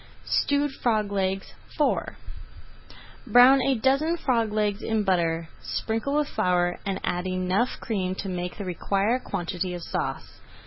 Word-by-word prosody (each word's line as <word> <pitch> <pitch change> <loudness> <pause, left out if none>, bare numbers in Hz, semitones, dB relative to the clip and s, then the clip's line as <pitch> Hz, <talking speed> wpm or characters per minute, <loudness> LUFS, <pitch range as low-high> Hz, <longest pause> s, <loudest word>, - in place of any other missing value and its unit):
STEWED 285 0 +1
FROG 215 -6 0
LEGS 195 -1 -1 0.3
IV - - +1 1.1
Brown 255 +2 +7
a 270 +1 +2
dozen 275 +8 +2
frog 230 -8 +1
legs 210 0 0
in 220 -1 0
butter, 170 -4 +1
sprinkle 225 +6 -2
with 300 -1 +2
flour, 175 -1 +1
and 195 -1 -1
add 180 +1 -1
enough 185 +6 0
cream 190 -5 -2
to 195 - -5
make 180 -1 -4
the 200 - -5
required 200 +7 0
quantity 180 -1 -3
of 175 - -7
sauce. - - -4
200 Hz, 140 wpm, -26 LUFS, 185-245 Hz, 1.1 s, Brown